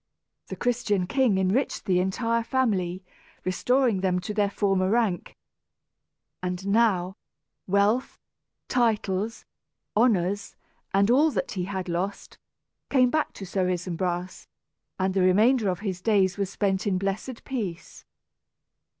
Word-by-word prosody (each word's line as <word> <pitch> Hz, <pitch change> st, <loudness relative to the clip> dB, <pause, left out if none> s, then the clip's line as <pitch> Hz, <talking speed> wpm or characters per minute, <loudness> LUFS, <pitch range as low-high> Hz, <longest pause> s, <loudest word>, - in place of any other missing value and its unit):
The -, -, -6 dB
Christian 220 Hz, -6 st, 0 dB
king 245 Hz, -1 st, +2 dB
enriched 190 Hz, +8 st, 0 dB
the 180 Hz, -2 st, +2 dB
entire 230 Hz, +5 st, 0 dB
family, 195 Hz, -8 st, 0 dB, 0.4 s
restoring 235 Hz, +3 st, +1 dB
them 185 Hz, -1 st, +1 dB
to 195 Hz, +4 st, -4 dB
their 205 Hz, -1 st, +1 dB
former 195 Hz, -2 st, +1 dB
rank. 215 Hz, -5 st, 0 dB, 1.0 s
And 180 Hz, +1 st, -3 dB
now 200 Hz, -4 st, +2 dB, 0.5 s
wealth, 200 Hz, +6 st, +1 dB, 0.5 s
titles, 220 Hz, -3 st, 0 dB, 0.5 s
honors, 205 Hz, -3 st, +1 dB, 0.4 s
and 200 Hz, +3 st, +3 dB
all 295 Hz, +6 st, +5 dB
that 275 Hz, -, -2 dB
he 185 Hz, -3 st, -3 dB
had 190 Hz, -1 st, -4 dB
lost, 180 Hz, +4 st, -4 dB, 0.5 s
came 255 Hz, -3 st, +4 dB
back 310 Hz, -1 st, 0 dB
to 195 Hz, -, -8 dB
Sir 185 Hz, -1 st, -1 dB
Isumbras, 180 Hz, 0 st, -3 dB, 0.5 s
and 190 Hz, 0 st, 0 dB
the 190 Hz, -, +2 dB
remainder 210 Hz, +5 st, +4 dB
of 180 Hz, 0 st, -3 dB
his 190 Hz, -4 st, -3 dB
days 195 Hz, -3 st, +2 dB
was 200 Hz, -2 st, -2 dB
spent 195 Hz, 0 st, -1 dB
in 190 Hz, -2 st, +1 dB
blessed 195 Hz, +6 st, -3 dB
peace. 200 Hz, -10 st, -5 dB
195 Hz, 125 wpm, -26 LUFS, 185-230 Hz, 1.0 s, all